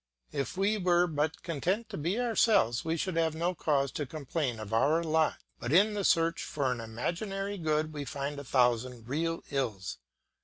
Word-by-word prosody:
If 140 +6 -3
we 205 +2 +2
were 175 -1 +4
but 155 -1 -2
content 180 +7 -1
to 210 - -6
be 175 +9 -1
ourselves 220 - +3
we 165 +1 -1
should 185 +1 -2
have 160 -1 +2
no 170 +3 0
cause 140 -5 +1
to 145 - -3
complain 140 -4 -3
of 110 0 -6
our 155 +9 +3
lot; 160 -1 +2 0.2
but 120 - -3
in 200 +6 +5
the 205 -1 -2
search 165 -2 +3
for 140 -3 -1
an 125 - -2
imaginary 195 - -3
good 155 -1 0
we 145 -1 -4
find 140 +2 -4
a - - -6
thousand 125 -2 +1
real 165 +5 -1
ills. 115 -9 -2
155 Hz, 185 wpm, -30 LUFS, 135-175 Hz, 0.2 s, in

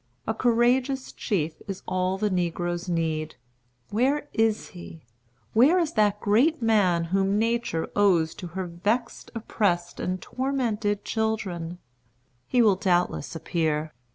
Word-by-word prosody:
A 220 - 0
courageous 250 +3 +1
chief 165 -6 -2
is 195 -2 -6
all 185 +1 0
the 210 +1 0
negroes 175 0 -2
need. 160 -2 -1 0.6
Where 275 +7 +1
is 225 -1 +1
he? 175 -3 -11 0.5
Where 270 +11 +5
is 330 -3 0
that 210 -2 +2
great 255 +12 +3
man 205 -7 +3
whom 195 +1 +2
Nature 230 -7 0
owes 180 -6 +3
to 180 - -8
her 190 - -1
vexed, 210 +8 -2
oppressed, 180 -6 -1
and 185 +1 -2
tormented 230 -6 -1
children? 190 -7 -2 0.7
He 245 -2 +3
will 205 -4 +4
doubtless 180 -3 0
appear. 160 -2 -1
205 Hz, 125 wpm, -26 LUFS, 175-230 Hz, 0.7 s, Where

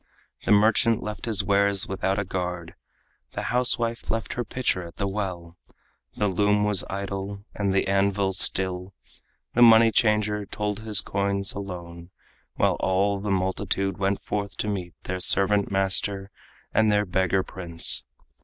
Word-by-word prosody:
The - - 0
merchant 110 +2 +4
left 105 0 -5
his 105 -3 +1
wares 100 0 +2
without 95 0 -1
a 100 - -1
guard; 90 -2 -4 0.6
The - - -4
housewife 120 -2 +1
left 115 0 -2
her 120 - -3
pitcher 120 -4 -2
at 85 -1 -10
the 100 - -1
well; 90 -4 -5 0.6
The 105 - +1
loom 105 +2 +1
was 105 -2 +1
idle 100 +1 -5
and 100 -1 -1
the 95 - +1
anvil 100 0 +1
still; 95 0 0 0.6
The 120 - +1
money 115 -1 +7
changer 105 -2 +1
told 105 0 -3
his 110 -3 +2
coins 100 0 -2
alone, 85 -3 -8 0.5
While - - +1
all 100 +1 +1
the 105 +1 -4
multitude 95 +1 -1
went 100 0 -1
forth 100 -1 -4
to - - -2
meet 95 -4 -4
Their 90 0 -4
servant 100 +2 +3
master 95 0 +1 0.4
and 110 0 +3
their 105 0 +2
beggar 95 0 0
prince. 85 -3 +2
100 Hz, 150 wpm, -25 LUFS, 95-105 Hz, 0.6 s, money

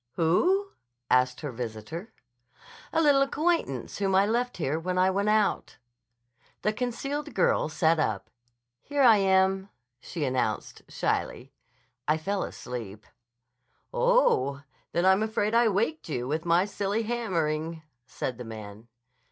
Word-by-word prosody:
"Who?" 370 - +2 0.4
asked 125 0 +3
her 145 - -4
visitor. 120 - -6 0.8
"A 325 - +2
little 285 -2 +5
acquaintance 290 - 0
whom 195 -1 +1
I 195 +1 +5
left 240 +3 -1
here 155 -2 -1
when 180 +2 -2
I 185 +1 +4
went 200 +2 0
out." 215 -1 +1 0.9
The 215 - +1
concealed 275 +6 -3
girl - - +2
sat 160 +1 +2
up. 110 -10 -1 0.5
"Here 285 -1 0
I 230 -4 +8
am," 190 0 +2 0.3
she 150 +4 -4
announced 125 -5 -2
shyly. - - -2 0.5
"I 155 +1 +3
fell 195 +5 -2
asleep." 110 -4 -7 0.9
"Oh, 485 - +2 0.3
then 170 +2 +1
I'm 190 +2 +5
afraid 215 -1 0
I 235 0 +5
waked 220 - -1
you 125 -5 -2
up - - -5
with 160 +3 -2
my 170 +2 +3
silly 205 +2 -2
hammering," 165 -8 -2 0.2
said 125 -2 -4
the - - -5
man. 110 -1 -9
190 Hz, 135 wpm, -27 LUFS, 145-225 Hz, 0.9 s, I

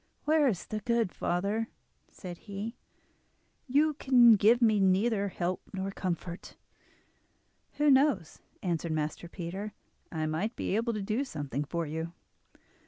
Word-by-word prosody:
"Where 305 -1 +4
is 200 -9 -1
the 215 - -4
good, 230 -2 +1
father?" 200 +6 -1 0.4
said 175 -3 -9
he. 210 +3 -6 0.9
"You 295 +4 +3
can 250 -5 +6
give 220 +4 +5
me 220 -4 +4
neither 200 +2 +2
help 180 -1 -2
nor 195 0 -3
comfort." 180 -2 -4 1.2
"Who 295 -1 +3
knows?" 265 - +2 0.2
answered 170 -3 -1
Master 155 +2 -3
Peter. 190 +4 -5 0.4
"I 155 -2 -2
might 175 +10 -2
be - - -1
able 230 +2 0
to 210 -2 -3
do 215 +7 0
something 145 - -4
for 170 +3 -3
you. 160 +2 -4
200 Hz, 135 wpm, -30 LUFS, 175-235 Hz, 1.2 s, can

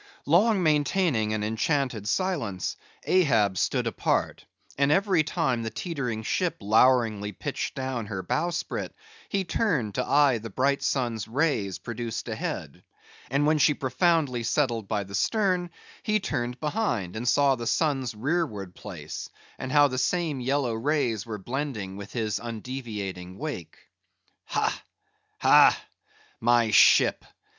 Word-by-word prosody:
Long 190 +6 +4
maintaining 150 - +2
an 110 -1 -1
enchanted 110 0 -1
silence, 140 - -1 0.3
Ahab 115 - +3
stood - - 0
apart; - - -1 0.3
and 140 +1 +2
every 190 0 +3
time 155 -6 -1
the 115 - -3
tetering 125 - -4
ship 180 - -1
loweringly 110 -1 +3
pitched - - -4
down 130 -4 -3
her 95 -3 -4
bowsprit, 170 - -2 0.3
he 195 -1 0
turned 165 - 0
to - - -1
eye 140 -5 +3
the 115 +1 -7
bright 140 +6 +1
sun's 120 -5 -1
rays 115 - 0
produced 120 -1 -5
ahead; - - -5 0.5
and 140 +3 +1
when 155 0 +3
she 150 0 +4
profoundly 135 -1 +1
settled 115 -3 0
by 105 -1 -1
the 100 0 -12
stern, 180 - +1 0.3
he 215 0 +1
turned 125 -9 -3
behind, 150 - -1
and 120 +2 -1
saw 140 -1 +4
the 120 -3 -4
sun's 135 -7 0
rearward 110 - -2
place, 85 -9 -8 0.3
and 130 - -4
how 145 0 +6
the 130 -2 -3
same 165 -3 0
yellow 130 -1 0
rays 120 -3 -1
were 110 -2 -4
blending 115 -3 -4
with 100 0 -9
his 110 -3 -2
undeviating 105 -6 -6
wake. 145 - -6 0.7
"Ha, - - -1 0.6
ha, - - +6 0.6
my 120 -1 +3
ship! - - +5
125 Hz, 135 wpm, -26 LUFS, 110-150 Hz, 0.7 s, how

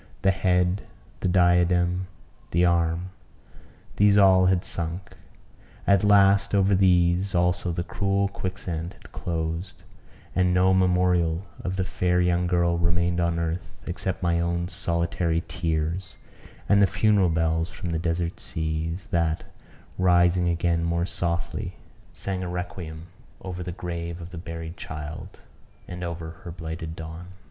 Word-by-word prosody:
The 95 - +5
head, 90 0 +1 0.4
the - - -1
diadem, 90 0 +3 0.4
the 85 +2 +3
arm, 85 +1 +1 0.9
these 100 0 +5
all 95 -2 +6
had 90 -1 +2
sunk; 85 +2 -4 0.7
at 100 -1 +4
last 100 -1 +5
over 100 0 +3
these 90 0 +3
also 90 0 +1
the 85 +1 -2
cruel 100 +1 0
quicksand 90 -3 -4
had - - -17
closed; 85 +1 -4 0.5
and 90 -1 +3
no 95 +1 +4
memorial 90 -2 +2 0.2
of 90 0 -2
the 95 - 0
fair 90 -1 0
young 90 0 +2
girl 85 -1 +2
remained 85 0 +1
on 85 -1 +1
earth, 85 +1 -4
except 95 +1 -3
my 85 -1 +2
own 85 +1 -1
solitary 85 -1 0
tears, 80 +2 -2 0.5
and 100 0 +5
the 100 - +6
funeral 100 -1 +3
bells 80 +1 +1
from 90 -3 -6
the 80 - -1
desert 85 0 -2
seas, 80 +3 -3
that, 85 -1 +1 0.6
rising 90 -1 +4
again 85 0 +1
more 85 +1 0
softly, 85 +2 -3 0.4
sang 95 -1 -4
a 90 - -3
requiem 90 -2 -6 0.4
over 90 -1 -5
the 90 0 -4
grave 85 -1 -5
of 85 +1 -9
the 90 - -8
buried 85 0 -7
child, 80 +1 -7 0.5
and 90 0 -6
over 85 -2 -5
her 90 - -7
blighted 80 -1 -6
dawn. 80 +2 -8
90 Hz, 140 wpm, -25 LUFS, 85-95 Hz, 0.9 s, all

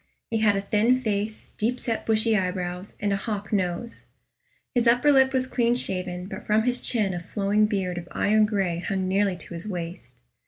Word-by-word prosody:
He 225 - +1
had 210 -2 +4
a 195 - 0
thin 220 +5 +2
face, 215 -2 -2
deep 240 +4 0
set 230 -2 -3
bushy 220 0 +3
eyebrows, 180 -1 -3
and 205 -1 0
a - - +1
hawk 205 0 -4
nose. 190 +4 -2 0.7
His 240 -2 +2
upper 245 +5 +5
lip 265 -1 +5
was 260 -1 +1
clean 240 -2 +1
shaven, 180 -5 -1
but 195 - -8
from 215 +1 +3
his 245 +1 0
chin 210 -6 +1
a 175 - -3
flowing 205 +3 +1
beard 185 -4 -2
of 175 - -10
iron 215 +1 +3
gray 190 -5 -1
hung 190 +1 -2
nearly 195 0 +1
to 175 - -11
his 170 +4 -7
waist. 170 - -6
205 Hz, 195 wpm, -25 LUFS, 185-225 Hz, 0.7 s, upper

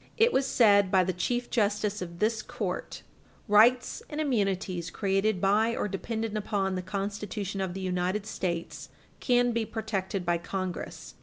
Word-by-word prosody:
214, 450 - +6
it 480 - 0
was 265 -1 +1
aid 200 -3 +6
by 190 -1 +5
the 185 +1 -1
Chief 240 +8 -1
Justice 210 -2 0
of 170 -1 -6
this 220 +3 +1
court: - - -5 0.4
"Rights 230 +4 +4
and 300 - -5
immunities 195 - 0
created 195 +2 0
by 215 +5 +3
or - - -1
dependent 220 +2 -3
upon 200 -2 -1
the 185 - -2
Constitution 200 +1 -4
of 190 -1 -3
the 190 - -4
United 185 +2 -1
States 170 -5 -4 0.3
can 245 -1 +3
be 230 -1 0
protected 200 -4 -3
by 170 0 +1
Congress. 185 +1 -5
200 Hz, 160 wpm, -28 LUFS, 185-220 Hz, 0.4 s, 214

